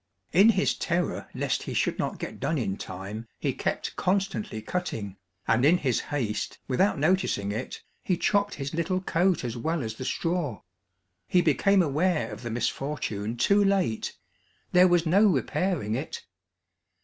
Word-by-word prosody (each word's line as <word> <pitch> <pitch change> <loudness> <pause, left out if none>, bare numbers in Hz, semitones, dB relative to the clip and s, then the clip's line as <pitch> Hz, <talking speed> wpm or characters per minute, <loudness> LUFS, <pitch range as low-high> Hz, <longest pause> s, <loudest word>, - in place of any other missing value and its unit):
In 195 +7 +7
his 195 -4 +3
terror 170 -1 -2
lest - - 0
he - - -5
should - - 0
not - - -2
get - - -6
done 160 - 0
in 100 -7 -1
time 100 +5 -7
he - - -1
kept - - -3
constantly 180 - -1
cutting, 110 - -4 0.3
and 120 - +3
in 160 +6 +6
his 130 -9 0
haste, 120 -8 -3
without 165 +9 +2
noticing 155 - +1
it, 110 +5 -5 0.2
he 180 - 0
chopped 205 +3 +1
his 140 +1 -5
little 170 +3 0
coat 180 -2 +1
as 120 -1 -3
well 160 +5 -1
as 110 -1 -4
the 130 +3 -7
straw. 165 - -2 0.6
He 180 - +4
became 190 +6 +4
aware 160 +3 +1
of - - -8
the 120 - -5
misfortune 115 -3 -2
too 200 - +4
late; 195 - 0 0.5
there 180 +1 +7
was 175 -1 +3
no 195 +6 +5
repairing 155 - 0
it. 135 +7 -4
155 Hz, 160 wpm, -27 LUFS, 115-185 Hz, 0.6 s, In